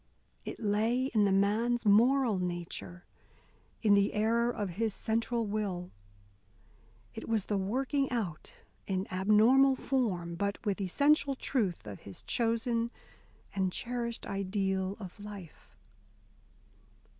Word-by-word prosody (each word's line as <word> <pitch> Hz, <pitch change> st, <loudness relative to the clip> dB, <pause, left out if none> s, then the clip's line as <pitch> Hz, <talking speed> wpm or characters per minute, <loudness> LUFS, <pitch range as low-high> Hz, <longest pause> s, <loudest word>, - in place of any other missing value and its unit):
It -, -, -6 dB
lay 225 Hz, +5 st, +1 dB
in 210 Hz, -2 st, +4 dB
the 200 Hz, -, +2 dB
man's 220 Hz, +5 st, +2 dB
moral 230 Hz, +1 st, +4 dB
nature, 170 Hz, -, -5 dB, 0.8 s
in 210 Hz, -2 st, +5 dB
the 200 Hz, +1 st, +3 dB
error 230 Hz, +3 st, +2 dB
of 210 Hz, -5 st, -2 dB
his 220 Hz, -3 st, 0 dB
central 230 Hz, +1 st, -1 dB
will. 200 Hz, -4 st, -3 dB, 1.2 s
It -, -, -7 dB
was 220 Hz, -4 st, +1 dB
the 205 Hz, -, 0 dB
working 265 Hz, +7 st, 0 dB
out, 200 Hz, -11 st, -3 dB, 0.4 s
in 190 Hz, -1 st, -1 dB
abnormal 220 Hz, +8 st, +5 dB
form, 205 Hz, -12 st, -1 dB
but 200 Hz, +3 st, -2 dB
with 205 Hz, -1 st, -1 dB
essential 280 Hz, -, +2 dB
truth, 210 Hz, -, -1 dB
of 100 Hz, -2 st, -8 dB
his 100 Hz, -, -11 dB
chosen 230 Hz, 0 st, 0 dB, 0.6 s
and 190 Hz, -2 st, 0 dB
cherished 235 Hz, +2 st, -3 dB
ideal 195 Hz, 0 st, -1 dB
of 190 Hz, -1 st, -9 dB
life. 205 Hz, -5 st, -11 dB
210 Hz, 120 wpm, -31 LUFS, 190-235 Hz, 1.2 s, in